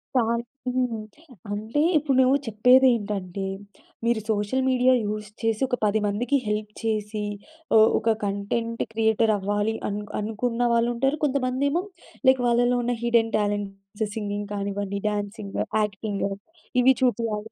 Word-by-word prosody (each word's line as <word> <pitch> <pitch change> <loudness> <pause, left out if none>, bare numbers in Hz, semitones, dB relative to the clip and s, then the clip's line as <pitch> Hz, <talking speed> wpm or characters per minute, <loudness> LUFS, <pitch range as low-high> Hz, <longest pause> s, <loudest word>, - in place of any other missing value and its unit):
Sir 235 -1 +2 0.3
హ్మ్. 250 -3 0 0.5
అంటే 220 +7 -1 0.2
ఇప్పుడు 285 -3 +1
నువ్వు 260 +2 +4
చెప్పేదేంటంటే 215 -5 +3 0.6
మీరు 235 -1 +2
సోషల్ 215 +5 0
మీడియా 255 0 +4
యూజ్ 210 0 -3
చేసి, 225 -2 0
ఒక 250 -1 -1
10 210 +1 +2
మందికి 240 +8 +1
హెల్ప్ 210 0 -2
చేసి, 215 -1 -2 0.5
ఒ - - +8 0.2
ఒక 225 0 +1
కంటెంట్ 205 +4 -2
క్రియేటరవ్వాలి 220 -1 +1
అన్ 205 0 -3 0.2
అనుకున్న 225 +3 -2
వాళ్ళుంటారు. 240 +5 +1
కొంతమందేమో 280 +4 0 0.4
లైక్ 260 -1 +5
వాళ్ళలో 245 +1 +3
ఉన్న 245 +1 0
హిడెన్ 235 -1 +2
టాలెంట్స్ 205 0 -3
సింగింగ్ 205 -1 -3
కానివ్వండి, 200 0 -3
డాన్సింగ్, 205 0 -4 0.3
యాక్టింగ్ 205 0 -3 0.6
ఇవి 265 +2 +6
చూపియాలి 225 -4 0
220 Hz, 120 wpm, -25 LUFS, 205-245 Hz, 0.6 s, ఒ